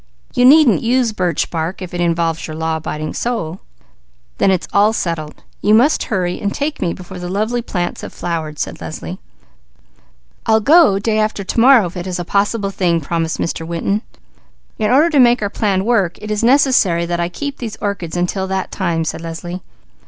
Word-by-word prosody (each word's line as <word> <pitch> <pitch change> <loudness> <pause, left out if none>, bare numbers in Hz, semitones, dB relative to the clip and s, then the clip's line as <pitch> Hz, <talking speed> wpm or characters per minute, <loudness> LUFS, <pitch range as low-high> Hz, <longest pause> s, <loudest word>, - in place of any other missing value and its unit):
You 250 - +3
needn't 265 - +6
use 240 -1 +1
birch 180 -4 -1
bark 165 +2 -3
if 185 -2 -8
it 175 - -2
involves 165 -1 0
your 155 - -6
law 160 0 -1
abiding 155 -1 -5
soul." 190 -8 -3 0.8
"Then - - +4
it's 185 -2 0
all 205 +2 +4
settled. 165 -7 -4 0.2
You 210 +1 +4
must 260 +7 +3
hurry 180 -4 -2
and 200 - -1
take 295 +5 -3
me 170 - 0
before 180 +1 -9
the 180 0 -5
lovely 215 +5 -1
plants 175 -6 -3
have - - -7
flowered," 160 -3 -4
said - - -4
Leslie. - - -7 1.3
"I'll 220 0 +4
go 295 - +5
day 215 +2 0
after 215 -1 -1
to 195 - -2
morrow," 235 -7 +6
promised 180 0 -4
Mr. 175 -5 -1
Winton. 185 +5 -1 0.8
"In 215 -1 +1
order 300 +7 +4
to 290 - +3
make 245 -1 +5
our 200 - -2
plan 195 -3 0
work, 200 -7 +1
it 210 0 -6
is 210 +1 -1
necessary 240 -10 +3
that 175 0 -2
I 170 0 0
keep 285 +9 -5
these 225 -3 -5
orchids 185 -6 -4
until 190 +2 -1
that 190 0 -3
time," 170 -4 -1
said 160 - -4
Leslie. 170 +2 -6
190 Hz, 175 wpm, -17 LUFS, 170-225 Hz, 1.3 s, needn't